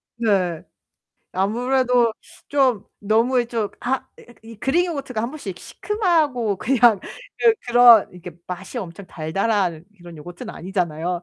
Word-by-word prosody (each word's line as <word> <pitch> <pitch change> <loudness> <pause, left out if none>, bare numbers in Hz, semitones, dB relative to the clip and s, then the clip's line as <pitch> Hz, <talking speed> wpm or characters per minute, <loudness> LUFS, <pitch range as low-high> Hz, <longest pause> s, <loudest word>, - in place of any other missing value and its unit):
네. 195 -8 0 0.7
아무래도 245 +4 +1 0.4
좀 260 -8 +2 0.2
너무 225 +5 +2
예 - - -1
좀 230 -3 -2
아 260 +2 -1 0.2
으 240 - -16
이 225 0 -12
그릭 305 - +1
요거트가 275 -9 -4
1 235 - -3
번씩 205 - -7
시큼하고 310 - 0
그냥 240 -1 +4 0.4
그 460 -2 +5
그런 240 -3 +7
이렇게 180 0 -10 0.2
맛이 185 +6 -6
엄청 185 -2 -8
달달한 180 0 -1
그런 175 -1 -12
요거트는 175 +4 -9
아니잖아요. 175 -1 -3
225 Hz, 275 characters per minute, -22 LUFS, 180-250 Hz, 0.7 s, 그런